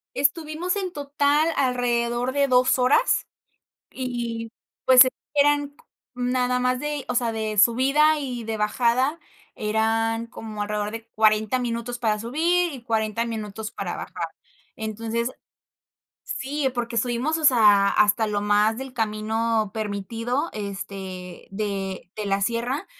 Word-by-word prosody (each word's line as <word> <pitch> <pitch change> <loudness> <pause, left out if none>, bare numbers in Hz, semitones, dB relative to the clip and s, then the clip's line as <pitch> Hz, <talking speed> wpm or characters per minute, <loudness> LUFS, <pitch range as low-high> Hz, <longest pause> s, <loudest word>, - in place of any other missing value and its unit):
Estuvimos 315 +5 0
en 380 -3 -2
total 290 +1 +1
alrededor 245 -1 0
de 280 0 +2
2 255 0 +3
horas 260 - +3 0.6
y, 235 -3 -4 0.3
pues, 255 0 +9 0.3
eran 290 0 +3
co 480 - -24 0.3
nada 250 0 0
más 250 0 +1
de, 295 0 -3
o 250 - -1
sea, 235 -1 +1
de 220 -1 -3
subida 275 +8 +4
y 250 -4 -4
de 220 0 -3
bajada, 245 +8 +1 0.4
eran 225 +1 0
como 220 -3 -7
alrededor 210 0 -2
de 225 0 -8
40 215 +2 +2
minutos 240 0 -3
para 220 -3 0
subir 335 +9 +1
y 260 -5 -9
40 225 0 0
minutos 220 -1 -5
para - - -4
bajar, - - -5 0.5
entonces 225 +2 -3 1.0
Sí, 275 +1 -2
porque 235 -1 -2
subimos, 245 +7 0
o 315 - -5
sea, 210 -6 +6
hasta 210 +2 +3
lo 205 -1 -1
más 210 +2 +3
del 265 +1 -7
camino 220 -1 0
permitido, 225 - -2
este, 195 -3 -7
de 195 -2 -4
de 210 -1 -4
la 195 0 0
sierra. 240 - -1
235 Hz, 135 wpm, -24 LUFS, 215-260 Hz, 1.0 s, pues